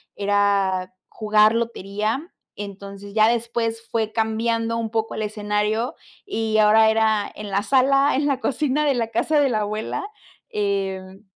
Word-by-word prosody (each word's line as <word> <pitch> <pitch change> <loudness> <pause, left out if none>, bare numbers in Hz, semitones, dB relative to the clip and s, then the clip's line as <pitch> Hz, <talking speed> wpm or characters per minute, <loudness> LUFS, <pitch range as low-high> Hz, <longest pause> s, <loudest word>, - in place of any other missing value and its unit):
era 200 -2 +1 0.2
jugar 215 0 +3
lotería. 225 - -2 0.3
Entonces, 200 0 -9
ya 215 0 +5
después 230 -1 -1
fue 220 -2 -1
cambiando 230 +1 0
un 225 -1 -2
poco 225 -1 -2
el - - -3
escenario, 210 +2 -1 0.3
y 225 - -1
ahora 220 +1 +6
era 220 -1 +2
en 210 -1 -8
la 200 +1 0
sala, 275 +3 +3
en 290 +2 +1
la 270 -2 0
cocina 295 +2 0
de 285 - +3
la 235 -2 -1
casa 300 +5 +1
de 275 - +3
la 215 -3 0
abuela. 215 - -3 0.4
Em, 195 -1 -3
220 Hz, 150 wpm, -22 LUFS, 205-230 Hz, 0.4 s, ahora